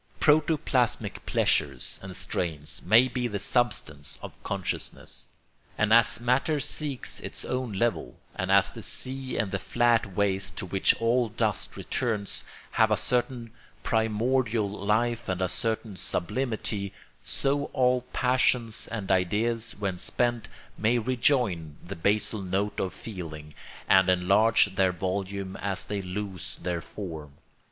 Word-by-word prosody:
Protoplasmic 150 -5 +2
pleasures - - +1
and 95 -1 -7
strains 85 -5 -1
may 115 +7 +6
be 125 -1 -2
the 105 -3 -3
substance 95 - 0
of - - -7
consciousness; 100 -2 -4 0.5
and 110 0 +3
as 115 0 +5
matter 125 +6 +1
seeks 140 -1 -1
its - - -4
own 125 -3 -2
level, 105 - -1 0.2
and - - -2
as - - +5
the - - -9
sea 130 0 -3
and 105 -4 0
the 95 - -1
flat 115 0 +1
waste 95 -1 +1
to - - -2
which 95 +1 +3
all 115 +1 +2
dust 110 -3 0
returns 110 -5 -2 0.3
have - - +4
a - - +2
certain 125 -2 -1 0.3
primordial 110 0 +1
life 110 +3 0
and 95 -1 -1
a 95 - +1
certain 110 +1 -2
sublimity, 105 +2 -2 0.3
so 140 +1 0
all 125 -2 +2
passions 125 -3 +1
and 105 -5 -3
ideas, 110 +5 +1
when 100 -3 -2
spent, 120 +3 0 0.3
may 115 +4 +3
rejoin 115 - +1
the 95 +3 -6
basal 105 +4 0
note 95 +2 -1
of 95 - -1
feeling, 80 -7 -8 0.3
and 95 -1 +5
enlarge 100 +3 +4
their 95 -2 +4
volume 95 +1 -3
as 95 -2 -3
they 100 -1 -3
lose 95 -2 -5
their 90 -1 -1
form. 80 -7 -8
105 Hz, 135 wpm, -27 LUFS, 95-120 Hz, 0.5 s, may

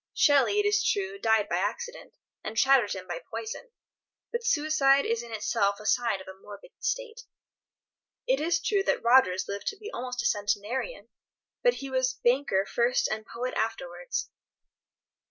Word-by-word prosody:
Shelley, 285 +7 +4
it 415 - +2
is 420 +1 +3
true, 395 0 -1
died 220 - +2
by 175 - -1
accident, 355 - -4 0.3
and 215 +1 -6
Chatterton 235 -8 +3
by - - -4
poison, 450 +3 -6 0.6
but 475 0 -3
suicide 295 -7 +3
is 230 0 0
in 235 -1 -10
itself 205 -2 0
a 210 - -11
sign 235 -3 +1
of 190 - -12
a 190 - -8
morbid 205 - -13
state. 475 -2 -3 1.0
It - - +2
is 330 +1 +1
true 395 +4 +1
that - - 0
Rogers 235 -6 +4
lived 200 0 -5
to 420 - -2
be 425 +2 -8
almost 250 0 -4
a - - -4
centenarian, 210 - -2 0.5
but - - +3
he 275 -1 -7
was 260 0 +1
banker 240 -6 +1
first 240 +1 +1
and 215 0 -4
poet 250 +2 -4
afterwards. 180 -6 -3
250 Hz, 160 wpm, -28 LUFS, -, 1.0 s, Shelley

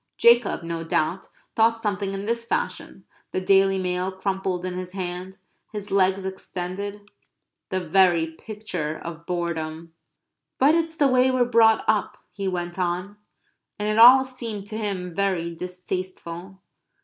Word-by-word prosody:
Jacob, 235 -6 +4
no 165 0 -4
doubt, 165 +2 -1 0.3
thought 230 +1 +4
something 200 -2 -2
in 195 +1 -5
this 230 +1 -1
fashion, 470 - -3 0.3
the - - +1
Daily 195 +1 +4
Mail 180 0 -1
crumpled 190 -1 -2
in 185 - -3
his 180 0 -6
hand; 185 0 -5 0.3
his 205 -2 -6
legs 190 0 +2
extended; 190 +2 -5 0.6
the 185 - -1
very 175 -1 +3
picture 160 -2 -5
of 165 0 -9
boredom. 165 -2 -3 0.6
"But 280 +4 +5
it's 325 -1 0
the 285 - +4
way 255 0 +4
we're 255 -1 +2
brought 225 -2 +4
up," 215 -2 +1
he 195 -1 -4
went 175 0 -3
on. 180 +3 -2 0.6
And 210 - -2
it 215 +1 +1
all 255 +3 +10
seemed 235 -6 -6
to 215 - -4
him 185 -5 -3
very 180 -3 -1
distasteful. 180 +1 -6
190 Hz, 145 wpm, -24 LUFS, 180-215 Hz, 0.6 s, all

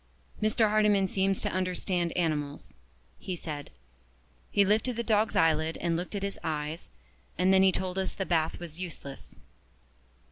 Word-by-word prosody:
"Mr. 215 0 +3
Hardyman 210 -2 +4
seems 190 0 0
to - - 0
understand 180 -1 -1
animals," 150 -4 -2 0.5
he 185 - -4
said. 150 -4 -6 0.8
"He 200 -1 +4
lifted 220 +5 +2
the 235 - -2
dog's 215 -2 +2
eyelid 160 0 +3
and 170 -1 0
looked 180 +4 -4
at 200 - -3
his 200 0 -3
eyes, 155 0 -3 0.5
and 185 +2 +4
then 190 - +6
he 190 0 +6
told 185 0 -2
us 190 - -2
the 190 - -2
bath 160 -3 +1
was 170 -1 -8
useless." 155 -6 -8
185 Hz, 155 wpm, -29 LUFS, 165-200 Hz, 0.8 s, then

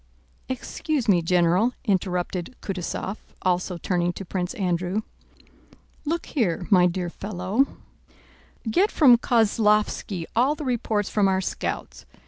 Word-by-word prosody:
"Excuse 260 +1 -2
me, 185 -5 +4
General," 180 +7 +3
interrupted 180 +1 -1
Kutúzov, 190 +1 -3 0.3
also 180 0 0
turning 175 0 0
to 195 - -7
Prince 180 +3 -3
Andrew. 185 0 -1 1.0
"Look 330 +3 -1
here, 195 - -1
my 180 -2 +6
dear 175 -1 -3
fellow, 200 +7 0 1.0
get 365 - +3
from 265 -6 +6
Kozlóvski 210 -5 +2
all 260 +6 +3
the 300 - -6
reports 225 -5 -1
from 205 -2 +3
our 190 0 +2
scouts. 190 - -4
195 Hz, 115 wpm, -25 LUFS, 180-230 Hz, 1.0 s, my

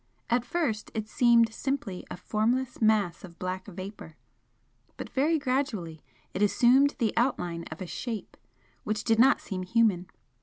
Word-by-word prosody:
At 240 0 +3
first 245 -6 -2
it 215 -1 -3
seemed 230 -1 +4
simply 245 -10 -3
a - - -6
formless 235 +7 -1
mass 215 -6 +2
of 175 -2 -11
black 185 +1 -4
vapour, 190 -4 -9 0.8
but - - -7
very 305 +5 +2
gradually 250 - -2 0.3
it 190 - -3
assumed 255 +7 +4
the 230 -6 0
outline 175 -9 0
of 155 +4 -9
a - - -6
Shape 225 +4 -5 0.5
which 210 0 -2
did 225 -1 +2
not 260 +3 +6
seem 190 -3 -5
human. 185 -2 +2
220 Hz, 150 wpm, -28 LUFS, 185-245 Hz, 0.8 s, not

